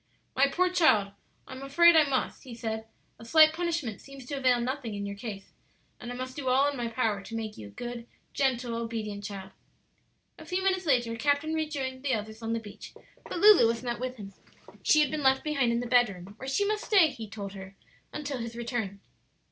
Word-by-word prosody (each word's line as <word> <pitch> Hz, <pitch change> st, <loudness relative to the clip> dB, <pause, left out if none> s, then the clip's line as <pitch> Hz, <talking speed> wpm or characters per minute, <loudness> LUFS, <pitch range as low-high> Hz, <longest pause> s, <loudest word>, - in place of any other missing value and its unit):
"My 275 Hz, +2 st, +5 dB
poor 360 Hz, +6 st, +1 dB
child, 225 Hz, -, +4 dB, 0.4 s
I -, -, -12 dB
am 260 Hz, -, -8 dB
afraid 335 Hz, +5 st, +5 dB
I 315 Hz, -2 st, +7 dB
must," 260 Hz, -2 st, -1 dB
he 250 Hz, -3 st, -9 dB
said; 220 Hz, -1 st, -4 dB, 0.3 s
"a -, -, -11 dB
slight 310 Hz, +6 st, +6 dB
punishment 330 Hz, -, -2 dB
seems 275 Hz, -2 st, -12 dB
to 285 Hz, -, -7 dB
avail 255 Hz, -3 st, +3 dB
nothing 245 Hz, -2 st, -3 dB
in 200 Hz, 0 st, -4 dB
your 200 Hz, 0 st, -5 dB
case, 200 Hz, -2 st, -8 dB, 0.5 s
and 245 Hz, 0 st, -7 dB
I -, -, -5 dB
must 255 Hz, +1 st, -6 dB
do 280 Hz, -3 st, -5 dB
all 265 Hz, +3 st, +4 dB
in -, -, -7 dB
my 240 Hz, -2 st, -2 dB
power 225 Hz, -3 st, -1 dB
to 225 Hz, +3 st, -8 dB
make 220 Hz, -2 st, -4 dB
you 105 Hz, -, -9 dB
a -, -, -12 dB
good, 240 Hz, -, -7 dB, 0.3 s
gentle, 250 Hz, -3 st, 0 dB
obedient 225 Hz, -3 st, -4 dB
child." 195 Hz, -2 st, -7 dB, 0.9 s
A 315 Hz, -, -11 dB
few 365 Hz, +2 st, -1 dB
minutes 375 Hz, -2 st, +1 dB
later 240 Hz, -4 st, +2 dB
Captain 285 Hz, +5 st, +1 dB
Raymond 315 Hz, -1 st, -1 dB
joined 260 Hz, -3 st, -4 dB
the 265 Hz, -4 st, +1 dB
others 220 Hz, +1 st, -6 dB
on 225 Hz, 0 st, -2 dB
the 230 Hz, -, 0 dB
beach, 210 Hz, -2 st, -11 dB, 0.3 s
but -, -, -5 dB
Lulu 405 Hz, -, +7 dB
was 230 Hz, +1 st, -1 dB
not 240 Hz, -1 st, -3 dB
with 255 Hz, 0 st, -4 dB
him. 200 Hz, -4 st, -10 dB, 0.5 s
She 305 Hz, -, +5 dB
had 295 Hz, -3 st, +1 dB
been 310 Hz, -, -2 dB
left 265 Hz, -1 st, +3 dB
behind 280 Hz, -6 st, +1 dB
in 235 Hz, 0 st, 0 dB
the -, -, -4 dB
bedroom, 205 Hz, -6 st, +1 dB
where 265 Hz, +3 st, -6 dB
she 405 Hz, +9 st, +1 dB
must 425 Hz, +1 st, -1 dB
stay, 380 Hz, -7 st, +5 dB
he 225 Hz, -5 st, -8 dB
told 200 Hz, -2 st, -7 dB
her, 190 Hz, 0 st, -10 dB, 0.4 s
until 285 Hz, -3 st, -4 dB
his 230 Hz, 0 st, -6 dB
return. 230 Hz, -5 st, -4 dB
245 Hz, 220 wpm, -28 LUFS, 225-285 Hz, 0.9 s, I